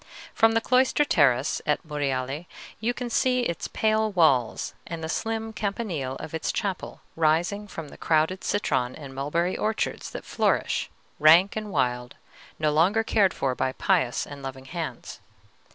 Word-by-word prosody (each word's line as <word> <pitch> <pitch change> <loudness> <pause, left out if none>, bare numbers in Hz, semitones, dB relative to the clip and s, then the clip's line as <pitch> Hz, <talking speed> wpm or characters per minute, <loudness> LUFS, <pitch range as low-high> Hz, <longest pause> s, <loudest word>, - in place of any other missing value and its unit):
From 225 0 +4
the 225 - +2
cloister 260 +4 +3
terrace 140 - +2
at 150 - 0
Monreale 140 +1 -2 0.3
you 225 +3 0
can 245 0 -5
see 250 +2 +2
its 170 -8 -2
pale 220 0 +1
walls 140 - +2
and 165 -1 -6
the - - -2
slim 225 +6 -3
campanile 195 - -3
of 150 - -8
its 160 - -1
chapel 195 -3 -4
rising 170 +6 +1
from 165 -6 -8
the - - -14
crowded 160 +4 +1
citron 130 -11 0
and 140 -3 -9
mulberry 165 +7 -1
orchards 220 +1 -2
that - - -8
flourish, - - 0 0.3
rank 165 +6 +6
and 215 -1 -4
wild, 125 -3 -1 0.4
no 155 -1 +1
longer 185 +9 +3
cared 205 -4 +3
for 135 -4 -1
by 130 +1 -1
pious 125 -1 +1
and 140 -1 -10
loving 135 -1 -7
hands. 160 -4 -6
165 Hz, 155 wpm, -26 LUFS, 140-215 Hz, 0.4 s, rank